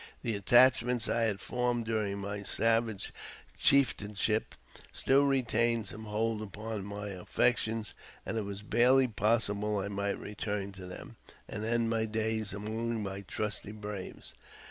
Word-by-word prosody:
The 115 Hz, -2 st, 0 dB
attachments 120 Hz, +2 st, +5 dB
I 115 Hz, 0 st, +2 dB
had 105 Hz, -3 st, 0 dB
formed 120 Hz, -1 st, -1 dB
during 105 Hz, -3 st, -1 dB
my 100 Hz, +1 st, -4 dB
savage 115 Hz, 0 st, +1 dB, 0.5 s
chieftainship 110 Hz, -5 st, +2 dB, 0.4 s
still 140 Hz, +1 st, +3 dB
retained 115 Hz, -4 st, +2 dB
some 110 Hz, +1 st, -7 dB
hold 110 Hz, +1 st, -1 dB
upon 110 Hz, 0 st, -5 dB
my 100 Hz, 0 st, -5 dB
affections, 110 Hz, +3 st, 0 dB, 0.3 s
and -, -, -3 dB
it 110 Hz, -, 0 dB
was 100 Hz, 0 st, -6 dB
barely 125 Hz, +5 st, +4 dB
possible 105 Hz, -2 st, +1 dB
I 100 Hz, 0 st, -2 dB
might 100 Hz, 0 st, -2 dB
return 105 Hz, -1 st, -4 dB
to 95 Hz, -1 st, -10 dB
them, 90 Hz, -, -10 dB, 0.3 s
and 105 Hz, -, -4 dB
end 115 Hz, 0 st, +1 dB
my 110 Hz, -1 st, +1 dB
da; 110 Hz, 0 st, -1 dB
among 110 Hz, +2 st, -3 dB
my 95 Hz, 0 st, -4 dB
trusty 105 Hz, +1 st, -4 dB
braves. 105 Hz, -3 st, -7 dB
110 Hz, 140 wpm, -31 LUFS, 100-115 Hz, 0.5 s, attachments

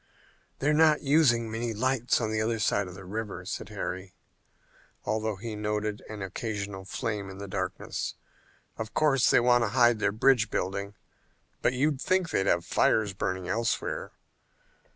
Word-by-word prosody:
"They're 145 Hz, +3 st, +2 dB
not 155 Hz, 0 st, +4 dB
using 135 Hz, -6 st, +3 dB
many 115 Hz, 0 st, -2 dB
lights 130 Hz, +1 st, +1 dB
on 110 Hz, -3 st, -1 dB
the 110 Hz, 0 st, 0 dB
other 115 Hz, +1 st, 0 dB
side 100 Hz, -2 st, +1 dB
of 90 Hz, -, -9 dB
the 95 Hz, -1 st, -10 dB
river," 100 Hz, -2 st, -5 dB
said 95 Hz, +1 st, -5 dB
Harry, 95 Hz, -3 st, -5 dB, 0.9 s
although 110 Hz, 0 st, -1 dB
he 110 Hz, +2 st, -6 dB
noted 105 Hz, 0 st, -2 dB
an 105 Hz, -2 st, -5 dB
occasional 100 Hz, -1 st, -4 dB
flame 100 Hz, +1 st, -3 dB
in 95 Hz, -, -9 dB
the 100 Hz, 0 st, -7 dB
darkness. 95 Hz, -1 st, -3 dB, 0.6 s
"Of 110 Hz, -1 st, -5 dB
course, 135 Hz, -5 st, +4 dB
they -, -, +6 dB
want 120 Hz, 0 st, +4 dB
to -, -, +1 dB
hide 120 Hz, -2 st, +5 dB
their 100 Hz, -, +2 dB
bridge 115 Hz, +1 st, +3 dB
building, 100 Hz, +2 st, -3 dB, 0.7 s
but 120 Hz, -, +2 dB
you'd 140 Hz, +1 st, +1 dB
think 185 Hz, -3 st, +1 dB
they'd 95 Hz, -, +1 dB
have 85 Hz, -2 st, +2 dB
fires 105 Hz, +2 st, +2 dB
burning 95 Hz, -1 st, -3 dB
elsewhere." 115 Hz, 0 st, -1 dB
110 Hz, 160 wpm, -28 LUFS, 100-120 Hz, 0.9 s, they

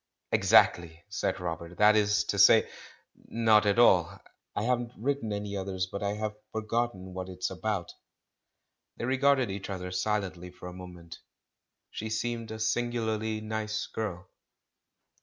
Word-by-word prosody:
"Exactly," 85 Hz, -1 st, +4 dB
said 105 Hz, -, -2 dB
Robert; 85 Hz, 0 st, -5 dB
"that 105 Hz, +1 st, +6 dB
is 105 Hz, -1 st, +3 dB
to -, -, -2 dB
say, -, -, +7 dB, 0.6 s
not 110 Hz, -2 st, +3 dB
at 100 Hz, -, +2 dB
all. 95 Hz, -8 st, +4 dB, 0.4 s
I 105 Hz, -, -1 dB
haven't 120 Hz, 0 st, 0 dB
written 130 Hz, -1 st, -2 dB
any 100 Hz, 0 st, -3 dB
others, 95 Hz, -1 st, -2 dB
but 100 Hz, +2 st, -7 dB
I 100 Hz, 0 st, -1 dB
have 105 Hz, 0 st, -3 dB, 0.2 s
for 110 Hz, -, -3 dB
gotten 110 Hz, -5 st, -2 dB
what 95 Hz, 0 st, -5 dB
it's 90 Hz, 0 st, -3 dB
about." 95 Hz, -1 st, -3 dB, 1.0 s
They -, -, -3 dB
regarded 130 Hz, -2 st, +2 dB
each 100 Hz, +1 st, -6 dB
other 90 Hz, -2 st, -5 dB
silently 90 Hz, -2 st, -2 dB
for 90 Hz, 0 st, -11 dB
a 90 Hz, -, -8 dB
mo 90 Hz, 0 st, -9 dB
ment.... 85 Hz, -2 st, -12 dB, 0.7 s
She 110 Hz, -, -5 dB
seemed 115 Hz, +1 st, -3 dB
a 110 Hz, -, -5 dB
singularly 110 Hz, -1 st, -1 dB
nice 110 Hz, 0 st, -3 dB
girl. 95 Hz, -5 st, -5 dB
105 Hz, 150 wpm, -29 LUFS, 95-110 Hz, 1.0 s, say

